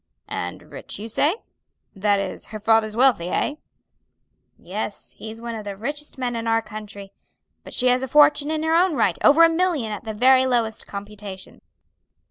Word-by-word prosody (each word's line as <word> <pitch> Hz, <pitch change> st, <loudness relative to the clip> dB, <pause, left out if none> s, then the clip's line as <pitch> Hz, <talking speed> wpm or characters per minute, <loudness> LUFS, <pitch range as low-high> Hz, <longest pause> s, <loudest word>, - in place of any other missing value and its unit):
"And -, -, -5 dB
rich -, -, -7 dB
you 215 Hz, -, -7 dB
say? 295 Hz, -, +1 dB, 0.6 s
that 200 Hz, +1 st, +2 dB
is 195 Hz, -2 st, -5 dB
her 215 Hz, -, -7 dB
father's 215 Hz, 0 st, +2 dB
wealthy, 245 Hz, -8 st, +3 dB
eh?" 290 Hz, -, 0 dB, 1.0 s
"Yes, -, -, -6 dB
he's 220 Hz, +1 st, -9 dB
one 235 Hz, 0 st, -6 dB
of 220 Hz, -2 st, -6 dB
the 200 Hz, -1 st, -6 dB
richest 290 Hz, +7 st, -5 dB
men 245 Hz, -2 st, -2 dB
in 230 Hz, 0 st, -4 dB
our 225 Hz, 0 st, +2 dB
county, 210 Hz, -2 st, -9 dB, 0.5 s
but -, -, -11 dB
she 250 Hz, -, +1 dB
has 250 Hz, 0 st, +3 dB
a 265 Hz, -, -3 dB
fortune 295 Hz, +1 st, +4 dB
in 315 Hz, 0 st, -1 dB
her 320 Hz, 0 st, +1 dB
own 345 Hz, 0 st, +3 dB
right, -, -, +1 dB
over 300 Hz, +3 st, +7 dB
a -, -, +9 dB
million 325 Hz, -9 st, 0 dB
at 210 Hz, -, -6 dB
the 220 Hz, -1 st, -5 dB
very 260 Hz, +3 st, +5 dB
lowest 230 Hz, -3 st, -1 dB
computation." 200 Hz, -1 st, -9 dB
230 Hz, 180 wpm, -23 LUFS, 210-285 Hz, 1.0 s, a